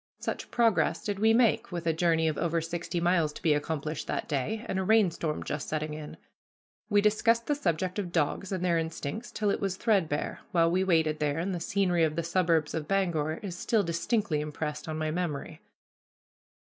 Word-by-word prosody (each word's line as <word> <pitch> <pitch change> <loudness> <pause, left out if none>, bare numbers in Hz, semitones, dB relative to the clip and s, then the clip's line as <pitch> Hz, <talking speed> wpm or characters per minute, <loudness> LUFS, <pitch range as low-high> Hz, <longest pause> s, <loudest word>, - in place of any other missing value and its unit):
Such - - -4
progress 230 -4 +2
did 205 -2 -3
we 220 +1 +5
make, 230 -1 +3
with 175 -1 -4
a 165 - +2
journey 165 -1 +2
of 155 - 0
over 170 0 0
sixty 170 +1 -3
miles 170 -3 +2
to - - -10
be 155 - +4
accomplished 155 0 -3
that - - -2
day, 185 - -2
and 190 - -1
a - - 0
rainstorm 185 -7 +2
just 145 0 -4
setting 155 0 -2
in. 150 -1 -8 0.7
We 205 -1 +4
discussed 230 +2 +3
the 295 - +1
subject 185 - -1
of 180 -4 -3
dogs 170 +4 0
and 185 -2 -1
their 170 -2 +3
instincts 165 +7 -4
till 210 -2 0
it - - -1
was 195 -2 -1
threadbare, 190 -11 0
while 165 -1 +4
we 185 +2 +2
waited 160 -4 +2
there, 150 -1 0
and 185 +4 -1
the 175 - -2
scenery 180 -1 +1
of 155 -1 +1
the 170 - -1
suburbs 165 -3 +1
of 155 -2 -3
Bangor 170 -6 +1
is 185 -4 -5
still 210 +3 +1
distinctly 170 -1 0
impressed 150 0 -4
on 155 0 -3
my 155 0 -1
memory. 160 -4 -3
170 Hz, 195 wpm, -29 LUFS, 155-195 Hz, 0.7 s, we